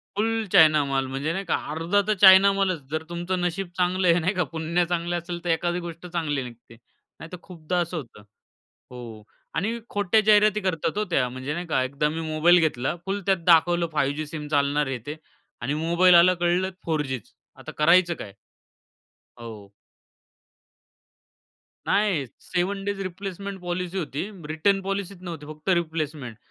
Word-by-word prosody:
फुल 225 +1 0
China 155 -2 +6
माल 135 -1 -1
म्हणजे 135 +4 -3
नाही 195 +2 -4
का, - - +1 0.2
अर्धा 165 +6 +1
तर 215 - +3
चायना 190 +1 +8
मालच 185 -5 0
जर 155 0 -2
तुमचं 175 +2 -3
नशीब 175 +2 -2
चांगलं 180 +1 +1
आहे 170 0 +5
नाही 180 +4 0
का 180 -2 0
पुण्य 165 +2 0
चांगलं 175 0 -2
असेल, 175 0 -6
तर 175 - -3
एखादी 175 +2 0
गोष्ट 170 0 -8
चांगली 160 -6 -2
निघते. 120 -1 -12 0.4
नाहीतर 165 +3 -9
खूपदा 180 -1 -4
असं 170 +1 -4
होतं. 115 -7 -9 0.7
हो 115 -4 -9 0.3
आणि 225 +6 -1
खोट्या 205 +1 +2
जाहिराती 215 0 +4
करतात 180 -1 -2
हो 210 - +1
त्या, 135 -7 +1
म्हणजे 130 +4 -5
नाही 175 +2 -4
का 130 -5 +1
एकदा 140 +3 -1
मी 160 - -4
मोबाईल 165 +3 +4
घेतला. 150 -2 0
फुल 195 +1 -2
त्यात 195 -2 +3
दाखवलं 170 0 +4
5G 150 +1 0
सिम 150 0 -7
चालणार 145 0 +1
हे 135 - -3
ते 150 +2 -5 0.5
आणि 135 +5 -2
मोबाईल 170 +3 +4
आला 175 +2 +7
कळलं 175 +2 0
4G 150 -5 -1
च - - -26 0.3
आता - - -9
करायचं 170 +3 +4
काय? 100 -11 -9 1.1
हो. 110 -4 -10 2.1
नाही 200 -9 +1 0.2
7 190 +2 -2
डेज 200 -1 -3
रिप्लेसमेंट 195 +1 -7
पॉलिसी 180 +1 -4
होती. 155 -3 -3 0.3
रिटर्न 195 +5 +1
पॉलिसीच 195 -1 -4
नव्हती 165 -5 -7
फक्त 155 +4 -7
रिप्लेसमेंट. 155 -8 -5
170 Hz, 165 wpm, -24 LUFS, 150-185 Hz, 2.1 s, चायना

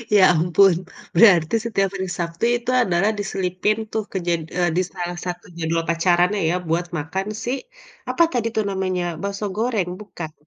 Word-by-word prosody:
Ya 200 - +7
ampun, 175 +3 +4 0.4
berarti 175 -2 +6
setiap 195 -4 +1
hari 190 -1 -3
Sabtu 170 +4 -2
itu 240 +1 -7
adalah 185 +2 +2
diselipin 195 +1 -1
tuh, 220 - -1
kejad 175 -3 -1 0.2
eee, 175 -1 +2
di - - +4
salah 175 -1 -4
satu 175 -1 -5
jadwal 165 0 0
pacarannya 175 +4 +2
ya, 175 - +1
buat 170 +2 +1
makan 160 +6 -3 0.2
si, 245 - -1 0.6
apa 340 - +3
tadi 235 -2 0
tuh 220 - +2
namanya, 185 -2 -1 0.2
bakso 200 +1 -3
goreng, 220 -5 0
bukan? 170 -6 -7
185 Hz, 160 wpm, -22 LUFS, 170-200 Hz, 0.6 s, Ya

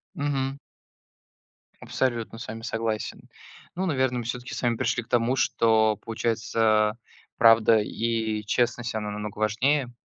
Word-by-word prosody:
Мгм. 140 -1 -2 1.2
Абсолютно 120 -3 -2
с 115 - -7
вами 110 +1 -7
согласен. 115 -1 -3 0.5
Ну, 185 +2 -2
наверно, 130 -6 +1
мы 120 - -4
всё-таки 125 +1 -5
с - - -4
вами 120 -1 +1
пришли 120 -1 0
к 115 - -20
тому, 120 +1 +2
что, 110 -4 +3
получается, 110 0 0 0.4
правда 115 -1 +6
и 110 0 -1
честность, 120 +2 0
она 105 -1 -3
намного 105 0 -6
важнее. 125 +5 +1
115 Hz, 130 wpm, -26 LUFS, 110-125 Hz, 1.2 s, правда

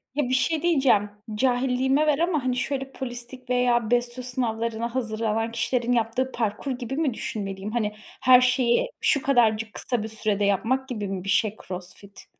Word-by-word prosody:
Ya, 290 -4 0
bir - - 0
şey 310 +4 +1
diyeceğim. 265 -11 +3 0.3
Cahilliğime 260 +4 +2
ver 295 0 +3
ama, 335 -5 +1
hani, 255 -1 0
şöyle 270 +1 -2
polislik 250 0 -7
veya 245 -2 +2
BESYO 245 +1 0
sınavlarına 235 -1 -2
hazırlanan 225 -1 -1
kişilerin 240 +1 0
yaptığı 240 +3 0
parkur 225 +4 -2
gibi 250 +1 -4
mi 295 -6 0
düşünmeliyim? 195 -2 -5
Hani, 210 -3 -1 0.3
her 255 -1 +7
şeyi 255 - +2
şu 280 - +3
kadarcık 225 -5 +2
kısa 245 -4 -2
bir - - -4
sürede 210 -2 -1
yapmak 230 +7 +1
gibi 210 -5 -3
mi 190 -2 -4
bir 195 - -5
şey 215 +1 +2
CrossFit? 185 +2 -9
240 Hz, 165 wpm, -25 LUFS, 220-260 Hz, 0.3 s, her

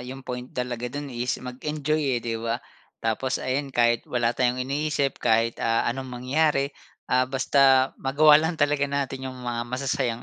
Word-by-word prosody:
'yung 130 +2 -8
point 125 0 -5
talaga 125 -1 -3
do'n 145 +2 -6
is 120 +1 -1
mag-enjoy, 145 +1 -1
eh, - - -2
'di 115 -1 -2
ba? 115 0 -1 0.5
Tapos 115 +4 0
ayan, 135 +2 -1
kahit 120 -1 +2
wala 120 -1 +1
tayong 125 +1 0
iniisip, 140 +1 -1
kahit, 115 +1 +2
ah, 115 0 +2
anong 130 +2 -5
mangyari, 135 +3 +1 0.4
ah, 130 0 +3
basta 135 0 +4
magawa 150 +3 +6
lang 160 +2 -1
talaga 145 -1 +2
natin 135 -1 -3
'yung 130 - -8
mga 120 -1 -2
masasayang 125 -2 -1
130 Hz, 165 wpm, -25 LUFS, 120-140 Hz, 0.5 s, magawa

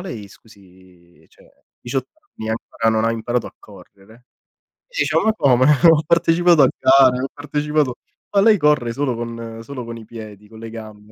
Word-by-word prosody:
lei, 115 - -8
scusi, 95 -4 -21
cioè, - - -23 0.3
18 130 +1 -4 0.3
anni 110 - -6
ancora 115 0 -3
non 110 0 0
ha 115 - +1
imparato 115 +1 -2
a - - -12
correre?” 100 +1 -17
Io 120 +1 -23 0.8
dicevo: - - +1
“Ma 220 - +3
come? 130 - +3 0.3
Ho 155 -2 +3
partecipato 170 0 +3
a 130 - +6
gare, 130 -1 +4
ho - - -1
partecipato” 150 -2 -2 0.4
“Ma 200 - +4
lei 215 0 +5
corre 150 -7 +1
solo 135 -1 -2
con 115 -1 -7
solo 130 0 -8
con 115 0 -8
i 115 - -12
piedi, 105 -2 -11
con 110 +1 -14
le 115 - -8
gambe, 110 -2 -11
115 Hz, 180 wpm, -19 LUFS, 110-145 Hz, 0.8 s, a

